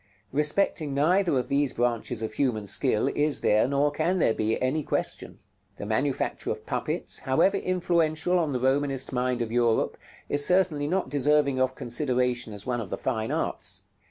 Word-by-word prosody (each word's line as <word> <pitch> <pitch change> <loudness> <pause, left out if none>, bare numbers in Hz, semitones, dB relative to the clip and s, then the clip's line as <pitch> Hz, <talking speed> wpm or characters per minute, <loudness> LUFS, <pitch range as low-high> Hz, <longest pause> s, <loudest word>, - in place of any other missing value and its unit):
Respecting 150 0 0
neither 170 +2 +2
of 125 - -1
these 140 0 +1
branches 120 -1 -1
of 110 - -4
human 120 -7 0
skill 100 - +1
is 150 0 0
there, 105 +3 +3
nor 140 +2 +1
can 165 +5 0
there 115 - +3
be, 110 +1 -1
any 130 +5 0
question. - - -3 0.4
The - - -6
manufacture 130 +6 -1
of - - -4
puppets, - - -2
however 160 +9 +2
influential 175 -2 +1
on 160 -3 0
the 125 - -1
Romanist 135 +1 0
mind 125 -1 0
of 110 - -6
Europe, 120 -1 +1 0.3
is 145 0 +1
certainly 175 -4 +2
not 180 -3 -1
deserving 145 -1 +2
of 130 0 +1
consideration 125 -2 0
as 105 -1 -7
one 120 -2 -1
of 105 - -7
the - - -3
fine 110 -1 -2
arts. - - -3
140 Hz, 170 wpm, -26 LUFS, 120-155 Hz, 0.4 s, there